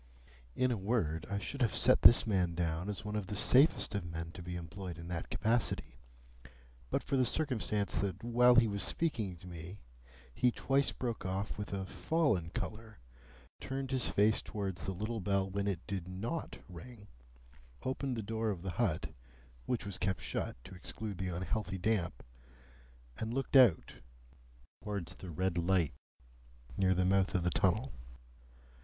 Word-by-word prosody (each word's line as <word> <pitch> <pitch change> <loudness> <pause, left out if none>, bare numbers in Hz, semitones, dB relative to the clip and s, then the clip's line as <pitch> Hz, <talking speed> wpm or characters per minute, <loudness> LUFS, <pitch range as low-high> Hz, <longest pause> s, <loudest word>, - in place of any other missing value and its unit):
In 130 0 +2
a 120 - 0
word, 95 -7 0
I 100 - -1
should 135 +7 -4
have 115 -6 +2
set - - +5
this 120 - +8
man 90 -6 +1
down 85 +2 -1
as 105 +1 -4
one 105 0 -3
of 105 -3 -2
the 105 - -4
safest 130 - +4
of 100 -2 -1
men 85 -1 -5
to 90 - -9
be 90 0 -5
employed 85 +1 -6
in 85 +1 -8
that 85 -2 -4
capacity, 115 +1 0 0.9
but - - 0
for 135 - 0
the 130 - +4
circumstance 120 -7 0
that 95 0 -2
while 120 +1 +5
he 120 -2 +6
was 100 -1 -1
speaking 110 - -1
to 85 - -14
me 90 +2 -8 0.6
he 125 - +3
twice 135 +3 +1
broke 120 -5 -3
off 95 +2 -2
with 105 - -5
a 95 -1 -2
fallen 100 - +1
colour, 110 +4 -5 0.6
turned 135 0 -4
his 130 -3 +2
face 105 +2 +3
towards 95 -6 -4
the 95 - -1
little 110 +5 -3
bell 100 0 +1
when 100 +1 -2
it 90 -4 -2
did 95 -3 -4
NOT 115 - -4
ring, 100 +5 -11 0.8
opened 130 -1 -2
the 110 - -3
door 110 +1 -1
of 90 -4 -3
the 95 - -2
hut 80 -7 0 0.6
(which 125 -2 -1
was 100 -2 -4
kept 95 0 0
shut - - -3
to 95 - -11
exclude 100 +2 -6
the 95 - -1
unhealthy 95 +3 -2
damp), 90 - 0 1.0
and 110 +2 -3
looked 135 +1 -2
out 125 -11 +6 0.9
towards 100 -5 -4
the 95 - -8
red 90 +2 0
light 85 -2 +2 0.8
near 95 -1 +3
the 90 +1 +2
mouth 95 +1 +3
of 90 - +2
the 90 - +1
tunnel. 105 - +1
100 Hz, 170 wpm, -34 LUFS, 90-115 Hz, 1.0 s, this